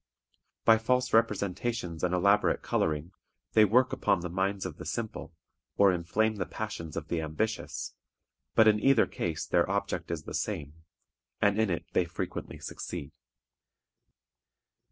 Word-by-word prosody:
By 110 -1 +7
false 125 +2 +1
representations 105 -4 0
and 90 - +2
elaborate 100 +3 +3
coloring, 80 +2 -1 0.4
they 110 -1 +7
work 125 +5 +3
upon 90 - +1
the 85 -1 -5
minds 95 +1 -1
of 85 -5 -6
the - - -8
simple, 115 -7 -4 0.5
or 100 -1 +6
inflame 105 +6 0
the 90 - -2
passions 85 -8 -5
of 80 -2 -4
the 85 - 0
ambitious, 105 +9 -3 0.6
but 110 - +6
in 105 -1 +5
either 135 -1 +5
case 80 -2 -3
their - - +2
object - - -2
is - - -3
the - - -8
same, 70 0 -3 0.7
and 105 +1 +3
in 110 -2 +2
it 85 - -2
they - - +3
frequently - - -5
succeed. 80 -6 -6
100 Hz, 145 wpm, -29 LUFS, 85-110 Hz, 0.7 s, By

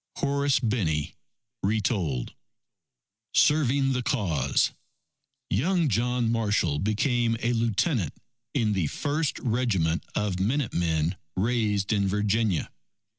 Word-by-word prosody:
Horace 140 -1 +1
Binney 100 - -1 0.5
(Retold) 95 - -1 1.0
SERVING 140 -3 +3
THE 125 - -1
CAUSE 80 - +1 0.8
Young 165 - +2
John 120 +1 +1
Marshall 105 -10 +1
became 115 +3 +1
a 120 +1 0
Lieutenant 115 - 0 0.4
in 110 -6 +2
the 90 -6 0
first 150 - -1
regiment 110 -10 0
of 105 -3 -1
Minute 120 +5 0
Men 85 +1 0 0.2
raised 105 -1 +1
in 100 -2 +1
Virginia. 105 -1 0
110 Hz, 100 wpm, -26 LUFS, 95-125 Hz, 1.0 s, SERVING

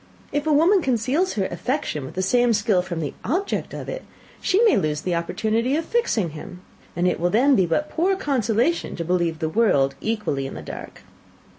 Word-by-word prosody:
If 290 +1 -1
a - - +3
woman 340 +7 +4
conceals 265 - 0
her 195 -3 -1
affection 175 - -2
with - - -10
the 185 - -1
same 240 +4 +3
skill 210 -3 +2
from 175 -2 -5
the 145 - -3
object 360 - -2
of - - -7
it, - - -5 0.4
she 380 - +2
may 445 - +5
lose 150 -1 0
the 180 - -2
opportunity 220 +9 0
of 320 +1 -1
fixing 230 - 0
him; 170 +4 -9 0.3
and 175 +1 +1
it 180 - 0
will 175 +1 +1
then 260 +8 +4
be 185 -6 +3
but 295 - 0
poor 370 +4 +1
consolation 265 - 0
to 170 - -4
believe 170 -2 0
the 160 - -2
world 155 -8 +2
equally 210 -12 -2
in - - -8
the - - -7
dark. - - -9
220 Hz, 200 wpm, -23 LUFS, 175-290 Hz, 0.4 s, may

